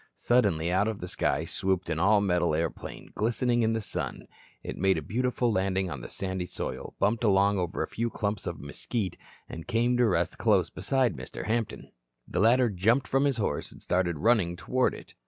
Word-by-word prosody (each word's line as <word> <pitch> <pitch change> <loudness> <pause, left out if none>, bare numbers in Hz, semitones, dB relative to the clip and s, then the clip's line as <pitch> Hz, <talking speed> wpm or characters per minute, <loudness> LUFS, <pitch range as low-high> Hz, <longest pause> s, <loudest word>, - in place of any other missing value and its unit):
Suddenly 95 -9 +2
out 95 +4 +2
of 110 -2 -3
the 90 - -5
sky - - 0
swooped 95 -2 -1
an 80 -1 -1
all 100 +3 +4
metal 90 -5 +2
airplane, 80 0 -4
glistening 120 +2 +1
in 110 0 +2
the 115 - 0
sun. 100 - -4 0.4
It - - -5
made 95 -1 +2
a - - -2
beautiful 125 - 0
landing 95 -2 0
on 70 -5 -5
the - - -8
sandy 95 -2 -3
soil, - - -6
bumped 110 +3 +1
along 100 -1 +4
over 90 -2 -2
a - - -4
few 115 +1 -2
clumps 105 -3 -3
of 85 -3 -4
mesquite, 95 - -3 0.3
and 80 - -8
came 120 +1 +2
to 120 -1 +4
rest 90 -3 0
close 100 -7 +3
beside 125 +5 +1
Mr. - - -7
Hampton. 115 -1 -2 0.4
The - - -2
latter 120 +3 +4
jumped 110 +8 +2
from 135 +1 +2
his 140 -3 +1
horse, 100 -9 -2
and - - -14
started 90 -2 0
running 100 -2 +2
toward 125 +8 0
it. - - -13
100 Hz, 195 wpm, -28 LUFS, 90-115 Hz, 0.4 s, all